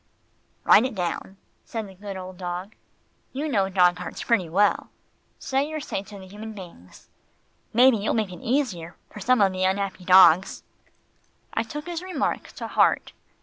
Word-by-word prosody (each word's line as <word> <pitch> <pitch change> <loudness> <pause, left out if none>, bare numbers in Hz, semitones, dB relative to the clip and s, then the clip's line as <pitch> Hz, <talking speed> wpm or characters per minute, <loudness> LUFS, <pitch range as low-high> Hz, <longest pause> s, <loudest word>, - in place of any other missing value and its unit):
"Write 220 - +6
it 255 -3 -3
down," 180 +1 -4 0.3
said 225 -3 -5
the 190 - -13
good 195 +1 -8
old 185 0 -8
dog. 180 +3 -5 0.6
"You 285 +4 -3
know 200 -9 +1
dog 180 -2 +3
hearts 180 - -6
pretty 200 -8 +1
well. 200 +5 +2 0.5
Say 275 +2 -1
your 310 0 -4
say 235 - -4
to 200 +1 -12
the 190 - -11
human 210 +3 -9
beings. 175 - -13 0.6
Maybe 250 +1 +5
you'll 205 +1 -1
make 215 -4 -1
it 175 - -11
easier 220 - -2 0.2
for - - -10
some 255 +3 +2
of 195 -1 +4
the 185 0 -2
unhappy 190 0 -1
dogs." 185 -1 +5 0.9
I - - +1
took 295 +7 -7
his 345 -1 -5
remark 365 -6 -2
to - - -7
heart. - - +2
200 Hz, 170 wpm, -24 LUFS, 185-235 Hz, 0.9 s, Write